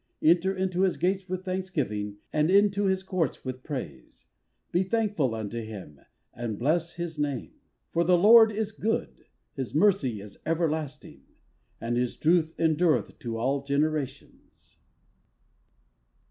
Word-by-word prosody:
Enter 175 +4 +4
into 185 -1 -1
his 190 -1 +2
gates 190 +1 -1
with 185 +1 -4
thanksgiving 145 - -3 0.2
And 150 +1 +2
into 200 +1 +4
his 190 0 +1
courts 180 -9 -2
with 130 0 -5
praise, 125 - -7 0.5
Be 175 - +2
thankful 190 - 0
unto 110 +1 -4
him, 100 -10 -9 0.3
and 115 -3 -4
bless 165 +6 0
his 170 -3 -5
name. 145 -4 -2 0.4
For 170 - +2
the 180 +1 +4
Lord 220 +4 +8
is 215 0 -2
good; 220 +1 -3 0.3
his 135 -2 -5
mercy 155 - +3
is 100 0 -12
everlasting: 155 - -2 0.6
And 120 +1 -2
his 125 0 -1
truth 165 0 +2
endureth 160 0 +1
to 115 -2 -4
all 135 +4 0
generations. 140 -1 -3
160 Hz, 130 wpm, -27 LUFS, 130-185 Hz, 0.6 s, Lord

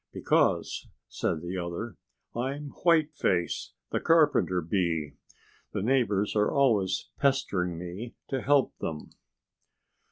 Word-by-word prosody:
"Because," - - +1 0.2
said 75 - -2
the 90 +2 -3
other, 85 +5 -4 0.4
"I'm 140 +4 -3
Whiteface, 155 - +1 0.2
the - - +1
Carpenter 150 - +3
Bee. 85 -4 -1 0.6
The - - -1
neighbors 110 -5 +1
are 105 0 +3
always 110 -9 +2
pestering 100 - +1
me 90 +7 -7
to 135 -2 -1
help 140 0 +3
them." 75 -2 -5
105 Hz, 105 wpm, -28 LUFS, 90-135 Hz, 0.6 s, Carpenter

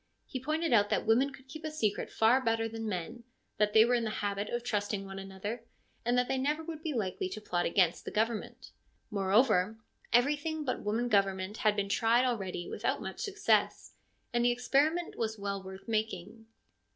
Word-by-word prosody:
He 260 - -5
pointed 310 +2 0
out 205 -2 +5
that - - 0
women 245 +6 +3
could 265 -1 -15
keep 315 +4 -9
a 310 - -2
secret 220 -10 -1
far 235 +4 +4
better 225 -1 +1
than 225 -1 -4
men; 210 +6 -5 0.3
that 210 -1 +2
they 220 0 +8
were 245 - +2
in 240 -1 +2
the 220 - -1
habit 205 -1 -2
of 240 0 -2
trusting 205 -3 -1
one 195 0 -7
another, 195 +4 -6 0.4
and 240 +1 +1
that 250 0 +2
they 265 - 0
never 300 +4 0
would 320 -1 -7
be 320 -1 -2
likely 190 -7 -2
to 215 - -6
plot 175 -4 -1
against 175 -1 +2
the - - -5
government; 220 +1 -2 0.4
moreover, 205 0 +3 0.3
everything 295 +5 +2
but 255 - -1
woman 225 +4 0
government 195 -1 +1
had 215 -1 +2
been 200 -1 -1
tried 230 +4 +3
already 195 -8 -2
without - - -1
much - - -6
success, 410 0 +1 0.4
and 240 0 +2
the 245 - +5
experiment 280 +8 +1
was 220 -1 -1
well 200 -1 -3
worth 190 +2 -10
making. 220 -1 -3
225 Hz, 190 wpm, -31 LUFS, 200-250 Hz, 0.4 s, they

